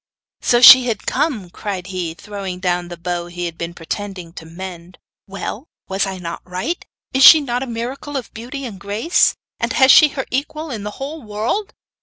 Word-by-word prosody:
'So 240 0 +3
she 255 0 +10
had 220 -4 -3
come!' 220 - -1
cried 190 -3 -5
he, 180 -3 -4
throwing 195 -2 -7
down 180 -1 -1
the 175 0 -8
bow 175 0 -3
he 175 0 -5
had 170 -1 -5
been 170 0 -5
pretending 180 0 -6
to 160 - -10
mend. 175 +1 -9 0.3
'Well, 200 +7 -6 0.2
was 195 +1 -1
I 190 -1 -5
not 170 -2 -6
right? 185 - -4 0.3
Is 265 0 +3
she 315 - +11
not 250 -4 -2
a 265 - -4
miracle 250 +5 -5
of 255 - -7
beauty 260 +5 -7
and 205 -6 -8
grace? 210 - +1 0.2
And - - -1
has 265 -1 +6
she 305 - +8
her 265 - -2
equal 305 +3 -3
in 220 -4 -5
the 210 - -4
whole 295 +4 -6
world? 225 - -3
205 Hz, 195 wpm, -19 LUFS, 180-260 Hz, 0.3 s, she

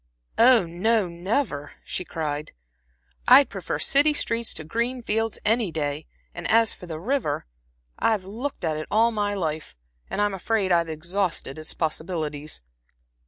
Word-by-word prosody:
"Oh, 235 -4 +7
no, 195 +5 +1
never," 170 - -2
she - - -4
cried. 150 -3 -4 0.7
"I'd 265 +2 +8
prefer - - -3
city 295 +2 +4
streets 230 -4 0
to 155 - -4
green 235 +9 -2
fields 225 0 0
any 220 -3 +2
day, 150 -1 -3 0.3
and - - -5
as 225 -1 +5
for 180 - -11
the 160 -2 -5
river 220 - -1 0.5
I've 215 -4 +1
looked 235 +7 -5
at 155 -1 0
it 155 - -5
all 230 +2 +4
my 205 -2 -1
life, 160 - -3 0.3
and - - -3
I'm 205 -1 +2
afraid 195 +1 0
I've 170 -1 +3
exhausted 165 -2 -2
its 155 - -8
possibilities." 155 - -3
190 Hz, 150 wpm, -25 LUFS, 160-225 Hz, 0.7 s, I'd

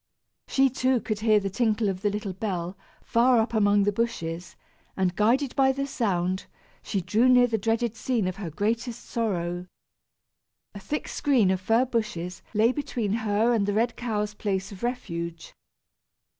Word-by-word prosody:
She 270 0 +4
too, 255 0 +2
could 215 -1 -3
hear 215 -1 +4
the 195 -1 -3
tinkle 220 0 +1
of 190 -1 -2
the 205 - +2
little 205 -1 -4
bell 185 -2 -3 0.3
far 240 +2 +4
up 225 +1 0
among 205 -2 +4
the 205 - +2
bushes, 175 -6 -3 0.4
and 185 -2 +1
guided 245 +7 +2
by 265 -1 +4
the 275 +1 -2
sound, 190 -8 -1 0.3
she 195 - -2
drew 225 +8 +3
near 250 -1 +7
the 225 -2 -1
dreaded 225 +2 0
scene 230 -5 0
of 185 - -3
her 195 -5 -5
greatest 230 - -2
sorrow. 180 -6 -2 1.1
A 200 - -8
thick 290 +10 -4
screen 255 -10 +2
of 185 -1 -1
fir 225 +6 +3
bushes 210 -8 -3
lay 220 +3 +4
between 240 -7 -2
her 220 +1 +2
and 205 -4 +1
the 205 - +1
red 230 +2 +1
cow's 210 -3 -2
place 195 -2 -2
of 195 - -10
refuge. 170 -9 -4
215 Hz, 170 wpm, -26 LUFS, 190-235 Hz, 1.1 s, near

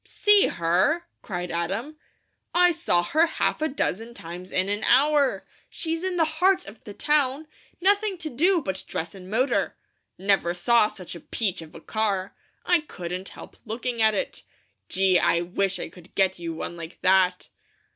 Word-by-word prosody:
"See 415 -1 +4
her!" 180 - +1 0.2
cried 180 -4 -5
Adam. 200 - -3 0.6
"I 355 0 +6
saw 175 - +2
her 315 - +3
half 320 - -1
a 310 - +2
dozen 235 - -3
times 175 +1 -9
in 185 +1 +1
an 205 +2 -2
hour. 285 +1 +3 0.2
She's 330 +1 -4
in 375 -1 -2
the 325 - +4
heart 360 +5 +2
of 210 +3 -13
the 205 - -8
town, 295 0 +1 0.3
nothing 400 +1 +2
to 325 -3 -4
do 345 +6 +2
but 190 -1 -3
dress 165 0 -4
and 185 -1 -11
motor. 250 +6 0 0.4
Never 190 -3 +1
saw 215 +5 +4
such 185 -4 -9
a 170 - -8
peach 190 -1 -3
of 160 -1 -13
a - - -9
car. 200 0 -2 0.3
I 355 -1 +4
couldn't 180 - -6
help - - -12
looking 235 +1 -3
at 220 -1 +4
it. - - -3 0.5
Gee, 190 -1 +3
I 170 - +2
wish 190 +2 -1
I - - -4
could 180 +1 -17
get 190 -2 +2
you 170 -1 -4
one 170 - -5
like 165 0 -9
that!" 185 -1 +3
210 Hz, 175 wpm, -25 LUFS, 180-305 Hz, 0.6 s, I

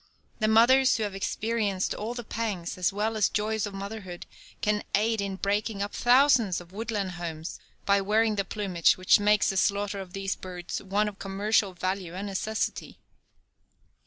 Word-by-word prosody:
That 215 - +2
mothers 255 +4 +5
who 220 - -1
have 205 -2 -3
experienced 205 -1 -1
all 225 +3 -4
the 240 - -5
pangs 210 -6 -3
as 180 +1 +1
well 215 +3 -1
as 215 -3 +2
joys 215 0 -1
of 200 - -8
motherhood 195 -3 -7 0.3
can 210 0 +1
aid 220 +1 +1
in 200 -1 -3
breaking 200 +1 -1
up 205 - -5
thousands 240 -6 +4
of 175 0 -14
woodland 210 -2 -3
homes 160 -1 -5 0.3
by 200 0 +3
wearing 215 +2 +2
the 200 - 0
plumage 190 -4 +1
which 185 +2 +5
makes 210 0 +3
the 195 - -3
slaughter 200 +1 +1
of 185 -2 -9
these 195 0 -2
birds 180 -2 -6
one 205 +2 0
of 205 -1 -7
commercial 200 0 +1
value 185 -1 -3
and 195 +2 -4
necessity. 210 +2 -3
205 Hz, 170 wpm, -27 LUFS, 190-220 Hz, 0.3 s, mothers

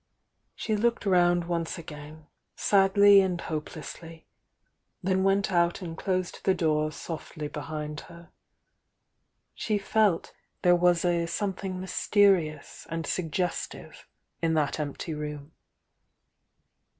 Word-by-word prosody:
She 215 - -1
looked 235 +2 0
round 175 -2 +4
once 170 -1 -2
again, 155 -1 -10 0.3
sadly 200 0 +6
and 185 -2 -1
hopelessly, 160 +1 -7 0.4
— - - -48
then 190 +1 +1
went 195 0 +2
out 175 +1 +2
and 165 -2 -6
closed 185 0 -2
the 190 - +3
door 155 -3 +1
softly 155 -2 -6
behind 150 0 -5
her. 170 0 -14 1.2
She 215 -2 -1
felt 205 -3 +1 0.3
there 175 0 +6
was 175 0 +3
a 170 -1 +1
sometliing 190 +1 -3
mysterious 185 -5 +1
and 165 0 -3
suggestive 175 +1 -3 0.3
in 165 -1 +1
that 150 0 0
empty 150 +2 -4
room. 150 0 -6
170 Hz, 115 wpm, -28 LUFS, 155-190 Hz, 1.2 s, sadly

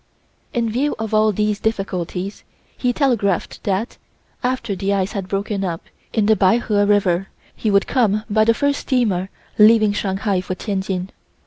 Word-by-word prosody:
In 235 -2 0
view 260 +7 0
of 220 0 -4
all 215 0 +4
these 210 0 0
difficulties, 195 -3 -3 0.3
he 250 - 0
telegraphed 230 - 0
that, 200 +4 -2 0.4
after 245 -4 -1
the 195 +2 0
ice 195 0 -1
had 195 -3 -4
broken 200 +1 -2
up 170 -3 -3 0.3
in 220 -3 +1
the 220 +1 +4
Peiho 205 +1 +2
River, 195 -3 +2 0.4
we 220 - +2
would 200 -1 +3
come 215 -5 +1
by 215 0 +3
the 230 +1 +3
first 285 +2 +1
steamer 205 -8 0 0.3
leaving 215 -1 +6
Shanghai 195 -1 -1
for 185 0 -4
Tientsin. 190 -2 -3
205 Hz, 155 wpm, -20 LUFS, 195-225 Hz, 0.4 s, leaving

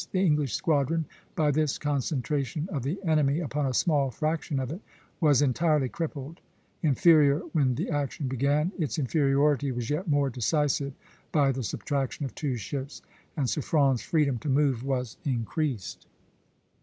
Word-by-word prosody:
The - - -1
English 150 - +1
squadron, 160 +1 +1 0.3
by 150 -2 +2
this 150 0 +1
concentration 145 +1 -1
of 140 - -2
the 140 +9 -2
enemy 155 -2 +2
upon 150 -3 -1
a 130 - -1
small 145 -4 +2
fraction 155 0 -2
of 130 0 -3
it, 175 +6 -6 0.4
was 145 -4 +4
entirely 145 0 +2
crippled. 155 0 -5 0.4
Inferior 150 0 +5
when 135 -6 +2
the - - -3
action 145 -1 -2
began, 140 +6 +1
its 155 0 -1
inferiority 140 -1 +2
was 120 +1 -3
yet 170 +6 -2
more 145 -3 +2
decisive 140 +3 0 0.4
by 140 -3 +3
the 130 0 -3
subtraction 140 +4 -2
of 135 - -6
two 140 -4 -2
ships, 130 +6 -6 0.3
and 140 -4 +1
Suffren's 140 -3 +1
freedom 140 -3 +1
to 145 - -4
move 135 -3 +2
was 130 -3 -2
increased. 130 - -2
145 Hz, 150 wpm, -27 LUFS, 130-155 Hz, 0.4 s, Inferior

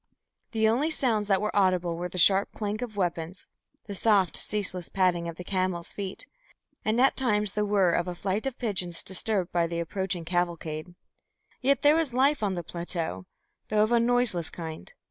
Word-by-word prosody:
The 220 -1 +2
only 255 +8 +2
sounds 230 -9 0
that 195 -2 +2
were 210 - -2
audible 185 -3 +2
were 175 +1 -4
the 185 - -7
sharp 195 +3 +4
clank 210 +1 -3
of 225 -4 -6
weapons, 175 -1 -3 0.4
the 205 - -6
soft 200 -3 +2
ceaseless 185 -4 -2
padding 180 -3 +1
of 170 - -5
the 180 - -8
camels' 185 -2 -2
feet, 195 -2 -5 0.6
and 220 +2 +1
at 265 +2 +4
times 210 -6 +1
the 210 0 0
whirr 195 -4 +3
of 175 +1 0
a 180 - -4
flight 195 +7 -2
of 265 - -4
pigeons 185 -7 -2
disturbed 190 -1 0
by 170 -1 +1
the 170 0 -3
approaching 180 0 -3
cavalcade. 170 -1 -2 0.7
Yet 275 +2 +2
there 295 +1 +6
was 315 -7 0
life 275 +2 +3
on 200 -3 0
the 175 - -4
plateau, 165 - -4 0.4
though 215 0 +3
of 215 - 0
a 235 - +5
noiseless 235 -8 +3
kind. 160 - -8
190 Hz, 185 wpm, -27 LUFS, 175-220 Hz, 0.7 s, there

